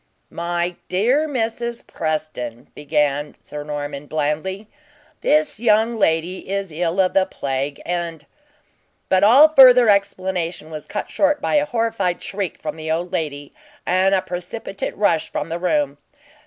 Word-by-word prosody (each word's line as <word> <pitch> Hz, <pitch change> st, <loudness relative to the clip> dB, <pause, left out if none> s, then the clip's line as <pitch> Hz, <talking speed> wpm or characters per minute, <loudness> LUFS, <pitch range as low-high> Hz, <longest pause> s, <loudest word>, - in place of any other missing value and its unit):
"My 175 Hz, +1 st, -2 dB
dear 245 Hz, +12 st, +2 dB
Mrs. 235 Hz, -2 st, -3 dB
Preston," 155 Hz, -7 st, -4 dB
began 150 Hz, -1 st, -1 dB
Sir 150 Hz, 0 st, -8 dB
Norman 145 Hz, -1 st, -5 dB
blandly, 155 Hz, +7 st, -2 dB, 0.5 s
"this 300 Hz, -6 st, +2 dB
young 225 Hz, 0 st, +3 dB
lady 175 Hz, -2 st, 0 dB
is 195 Hz, -2 st, -2 dB
ill 170 Hz, +3 st, -1 dB
of 185 Hz, -1 st, +3 dB
the 190 Hz, -1 st, +3 dB
plague, 140 Hz, -2 st, -3 dB
and 170 Hz, -3 st, -3 dB, 0.4 s
" -, -, -43 dB
But 190 Hz, +1 st, +3 dB
all 265 Hz, +9 st, +8 dB
further 250 Hz, -5 st, +8 dB
explanation 185 Hz, -5 st, 0 dB
was 155 Hz, -1 st, -7 dB
cut 210 Hz, -, -5 dB
short 295 Hz, 0 st, +2 dB
by -, -, -2 dB
a 295 Hz, 0 st, +1 dB
horrified 225 Hz, -8 st, -1 dB
shriek 195 Hz, -3 st, -4 dB
from 155 Hz, 0 st, -6 dB
the 160 Hz, 0 st, -6 dB
old 170 Hz, +3 st, -1 dB
lady, 145 Hz, -5 st, -4 dB, 0.3 s
and 190 Hz, +2 st, +3 dB
a 185 Hz, -, 0 dB
precipitate 180 Hz, +3 st, -5 dB
rush 175 Hz, -6 st, +1 dB
from 150 Hz, -, -3 dB
the 165 Hz, +1 st, -3 dB
room. 290 Hz, -, 0 dB
180 Hz, 145 wpm, -21 LUFS, 155-215 Hz, 0.5 s, all